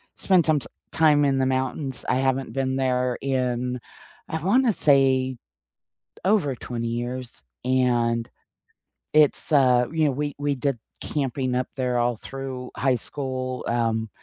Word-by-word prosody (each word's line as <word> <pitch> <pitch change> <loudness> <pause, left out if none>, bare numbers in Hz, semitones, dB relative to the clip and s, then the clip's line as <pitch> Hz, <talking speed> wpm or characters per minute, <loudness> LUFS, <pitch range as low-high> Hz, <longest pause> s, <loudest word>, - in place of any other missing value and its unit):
spend 185 -3 +3
some 155 -2 +3
t - - -10 0.3
time 150 -2 +4
in 135 -1 +2
the 130 - +2
mountains, 130 +1 -1
I 125 - +3
haven't 135 0 0
been 130 -1 -1
there 125 -1 0
in 125 -2 -1 0.5
I 160 -1 -3
wanna 235 +6 +3
say 130 -5 +3 0.9
over 185 -10 +2
20 115 -1 -4
years 120 - -5 0.2
and 120 -2 +1 0.9
it's, 155 +1 +3
uh 125 -4 +5
you 160 -1 +1
know, 145 - +3
we 145 +2 -3
we 145 -1 0
did 135 -2 -1 0.2
camping 135 -3 -2
up 125 0 0
there 125 -2 0
all 120 0 +1
through 130 +1 -7
high 130 -2 +2
school, 130 0 -4
um, 115 -2 0
130 Hz, 145 wpm, -24 LUFS, 125-140 Hz, 0.9 s, uh